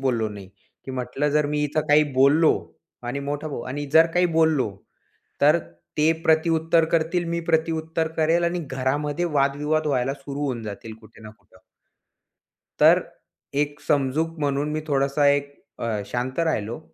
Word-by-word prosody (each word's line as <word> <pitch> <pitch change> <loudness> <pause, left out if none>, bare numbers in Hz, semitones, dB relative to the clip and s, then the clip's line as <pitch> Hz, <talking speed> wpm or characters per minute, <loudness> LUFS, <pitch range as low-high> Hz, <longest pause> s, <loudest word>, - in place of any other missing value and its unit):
बोललो 120 -5 0
नाही. 100 -2 -10 0.4
की 135 - -7
म्हटलं, 130 +3 -2
जर 150 0 +2
मी 150 0 -1
इथे 150 +2 0
काही 150 +1 +6
बोललो 140 +5 +5 0.5
आणि 125 +4 -4
मोठा 145 +2 -4
भाऊ 135 - -5
आणि 145 +2 -4
जर 160 +1 +7
काही 180 0 +4
बोललो, 155 -9 +3 0.7
तर 150 +4 +5 0.4
ते 155 +2 +4
प्रतिउत्तर 160 0 +3
करतील, 165 +2 +1
मी 170 0 -1
प्रतिउत्तर 160 0 0
करेन 165 +2 +2
आणि 170 +1 0
घरामध्ये 145 +5 -1
वादविवाद 150 0 0
व्हायला 135 -2 0
सुरू 140 +1 -7
होऊन 130 -5 -2
जातील 110 +2 -7
कुठे 115 - -17
ना 110 - -10
कुठे. 95 -2 -25 1.2
तर - - +7 0.6
एक 145 0 -5
समजूक 150 +4 0
म्हणून 145 +1 0
मी 155 - -2
थोडासा 140 0 +1
एक 140 0 +1 0.3
अ, - - -3 0.2
शांत 125 +5 -4
राहिलो. 120 -9 -1
145 Hz, 150 wpm, -23 LUFS, 135-160 Hz, 1.2 s, जर